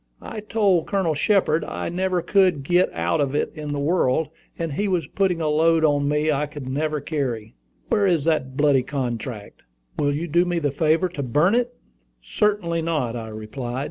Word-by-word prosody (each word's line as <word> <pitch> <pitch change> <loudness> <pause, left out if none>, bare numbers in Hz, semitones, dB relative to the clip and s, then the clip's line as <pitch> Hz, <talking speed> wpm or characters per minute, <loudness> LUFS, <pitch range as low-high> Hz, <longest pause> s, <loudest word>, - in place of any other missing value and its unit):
"I - - -6
told 205 -5 +1
Colonel 190 -5 +1
Shepard 160 -1 +2
I - - -4
never 180 0 -1
could 185 -8 +3
get 175 +5 +2
out 85 - 0
of 140 0 -1
it - - 0
in 150 -2 -6
the 145 - -2
world, 150 -1 +1 0.3
and 165 -3 -3
he 205 +8 -1
was 180 -5 0
putting 180 +2 0
a 155 - 0
load 160 +1 +3
on 145 -1 +2
me 150 +1 +1
I 150 +1 0
could 145 -3 -8
never 150 +3 -1
carry. 130 - -3 0.4
Where 200 -1 +3
is 170 -6 +2
that 145 -5 0
bloody 145 -3 +4
contract? 120 -5 -5 0.4
Will 145 - +2
you 165 +4 -3
do 170 +3 +3
me 175 -1 -1
the 145 -4 0
favor 160 +5 +2
to 160 -4 -5
burn 150 - +2
it?" 245 +1 0 0.4
"Certainly 170 - 0
not," 150 -8 -1
I 115 -2 -5
replied. 115 +4 -5
155 Hz, 190 wpm, -23 LUFS, 140-175 Hz, 0.4 s, bloody